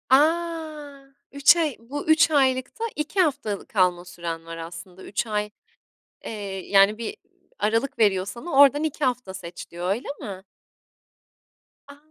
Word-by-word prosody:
A! 305 Hz, -2 st, 0 dB, 0.2 s
3 280 Hz, +4 st, +6 dB
ay 310 Hz, -6 st, 0 dB
bu 275 Hz, +7 st, -6 dB
3 315 Hz, 0 st, +5 dB
aylıkta 260 Hz, -, +1 dB
2 300 Hz, +6 st, -3 dB
haftalık 240 Hz, -, -1 dB
kalma 180 Hz, -3 st, +2 dB
süren 170 Hz, -2 st, -6 dB
var 165 Hz, 0 st, -7 dB
aslında 175 Hz, +3 st, -9 dB
3 220 Hz, -, -3 dB
ay 210 Hz, -1 st, -1 dB, 0.8 s
Eee, -, -, -4 dB, 0.4 s
yani 200 Hz, +2 st, +5 dB
bir 235 Hz, -, -5 dB, 0.4 s
aralık 230 Hz, +5 st, 0 dB
veriyor 190 Hz, -4 st, +3 dB
sana 240 Hz, -, -7 dB
oradan 285 Hz, +1 st, +6 dB
2 305 Hz, -1 st, -2 dB
hafta 250 Hz, -6 st, -2 dB
seç 180 Hz, -2 st, -9 dB
diyor, 175 Hz, +1 st, -4 dB
öyle 215 Hz, +7 st, -1 dB
mi? 190 Hz, -2 st, -7 dB, 1.5 s
A! 280 Hz, -, -12 dB
245 Hz, 140 wpm, -24 LUFS, 190-290 Hz, 1.5 s, 3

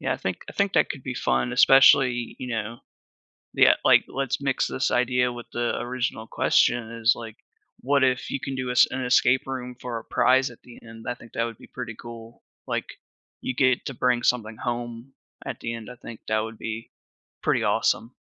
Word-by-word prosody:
Yeah, -, -, -1 dB
I -, -, -2 dB
think -, -, -3 dB
I -, -, -7 dB
think 200 Hz, -1 st, 0 dB
that -, -, +3 dB
could 135 Hz, -, -6 dB
be 125 Hz, -1 st, -5 dB
fun, 65 Hz, -, 0 dB
especially, 125 Hz, -1 st, +5 dB
you 125 Hz, -, -6 dB
know 115 Hz, 0 st, -4 dB, 0.8 s
yeah, -, -, +7 dB
like, -, -, +6 dB
let's 135 Hz, -1 st, -2 dB
mix 135 Hz, -2 st, +1 dB
this 130 Hz, -, -1 dB
idea 125 Hz, 0 st, +1 dB
with 120 Hz, 0 st, -9 dB
the 120 Hz, 0 st, -1 dB
original 120 Hz, -2 st, -3 dB
question, 115 Hz, 0 st, +2 dB
is, 115 Hz, +1 st, +4 dB
like, 115 Hz, -2 st, -9 dB, 0.4 s
what 140 Hz, +1 st, +2 dB
if 130 Hz, -1 st, 0 dB
you 140 Hz, -, -2 dB
can 135 Hz, -, -5 dB
do 130 Hz, -1 st, -3 dB
us 125 Hz, -, +6 dB
an 130 Hz, 0 st, -3 dB
escape 125 Hz, +1 st, +3 dB
room 125 Hz, -2 st, -5 dB
for 120 Hz, -2 st, -4 dB
a -, -, -11 dB
prize 130 Hz, 0 st, +3 dB
at 120 Hz, -, -15 dB
the 120 Hz, -, -15 dB
end? 115 Hz, -1 st, -12 dB
I 120 Hz, -, -1 dB
think 115 Hz, -2 st, -16 dB
that 115 Hz, -, 0 dB
would 115 Hz, -2 st, -5 dB
be -, -, -15 dB
pretty 120 Hz, -3 st, -7 dB
cool, 115 Hz, -1 st, -11 dB, 0.2 s
like, -, -, -2 dB, 0.6 s
you 130 Hz, -, -3 dB
get 130 Hz, -1 st, +2 dB
to 135 Hz, -, -4 dB
bring 125 Hz, 0 st, +1 dB
something 110 Hz, -3 st, 0 dB
home 120 Hz, +1 st, -5 dB, 0.3 s
at -, -, -5 dB
the 115 Hz, -, -4 dB
end, 115 Hz, -1 st, -7 dB
I 125 Hz, -, -10 dB
think 115 Hz, -1 st, -10 dB
that 110 Hz, 0 st, +2 dB
would 110 Hz, 0 st, -6 dB
be 115 Hz, 0 st, -6 dB, 0.5 s
pretty -, -, +1 dB
awesome. 115 Hz, +3 st, +1 dB
120 Hz, 205 wpm, -25 LUFS, 115-130 Hz, 0.8 s, yeah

